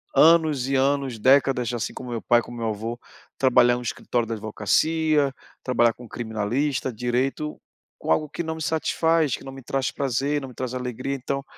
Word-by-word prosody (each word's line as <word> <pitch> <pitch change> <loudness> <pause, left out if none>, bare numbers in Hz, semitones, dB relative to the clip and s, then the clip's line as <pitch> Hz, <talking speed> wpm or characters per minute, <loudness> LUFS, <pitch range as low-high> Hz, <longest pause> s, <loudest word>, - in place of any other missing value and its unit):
anos 155 -5 +5
e 135 - -1
anos, 135 -3 +1
décadas 130 -1 +3
assim 120 -2 -3
como 125 - -8
meu 120 - -2
o - - -15
pai, 120 0 +4
como 120 0 -10
meu 115 -1 -2
o - - +1
avô, 115 +3 -5 0.4
trabalhar 120 -2 +5
num 125 - -5
escritório 120 0 -2
da 115 - -3
advocacia, 145 +8 +1 0.3
trabalhar 120 -3 +3
com 120 - -12
criminalista, 120 +5 -2
direito, 125 +6 -1 0.4
com - - -2
algo 150 - +2
que 150 - -5
não 160 -1 -3
me 160 - -8
satisfaz, 160 -1 +1
que - - -12
não 135 - -8
me 135 0 -10
traz 135 0 -1
prazer, 140 +2 -1
não 135 - -6
me 125 - -14
traz 130 -1 -4
alegria, 125 +1 -3
então 135 +1 -3
130 Hz, 195 wpm, -24 LUFS, 120-140 Hz, 0.4 s, anos